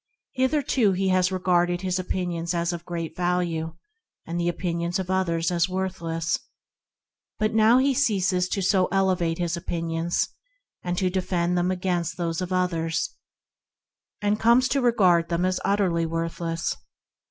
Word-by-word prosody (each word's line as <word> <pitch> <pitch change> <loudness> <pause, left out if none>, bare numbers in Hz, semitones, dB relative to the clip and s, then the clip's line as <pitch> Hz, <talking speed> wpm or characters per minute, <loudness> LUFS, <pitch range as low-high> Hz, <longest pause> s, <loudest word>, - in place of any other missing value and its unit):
Hitherto 260 -5 +2
he 190 +1 0
has 185 0 +2
regarded 175 -1 +1
his 185 -1 -1
own 185 - -5
opinions 175 -2 -2
as 170 +1 0
of 170 -1 -6
great 170 -2 -4
value 175 -2 -1 0.5
and 170 +1 -3
the 175 0 +1
opinions 170 0 -2
of 190 -1 -3
others 170 -3 0
as 175 +1 +1
worthless, 170 -3 -2 1.0
but 215 0 0
now 220 +2 +5
he 270 +1 +3
ceases 190 -8 +1 0.2
so 190 -3 +3
to - - -19
elevate 185 -4 +1
his 175 -1 -1
own 170 - -6
opinions 165 -1 -1 0.5
and 175 0 -3
to 185 -1 +1
defend 180 -1 0
them 175 +1 +1
against 180 -2 -1
those 170 -1 -2
of 180 0 -4
others, 170 -2 -1 1.2
coming 235 +2 +5
to 270 +2 +1
regard 185 -9 +3
them 170 +1 0
as 185 0 0
worthless. 165 -3 -1
180 Hz, 145 wpm, -25 LUFS, 170-190 Hz, 1.2 s, now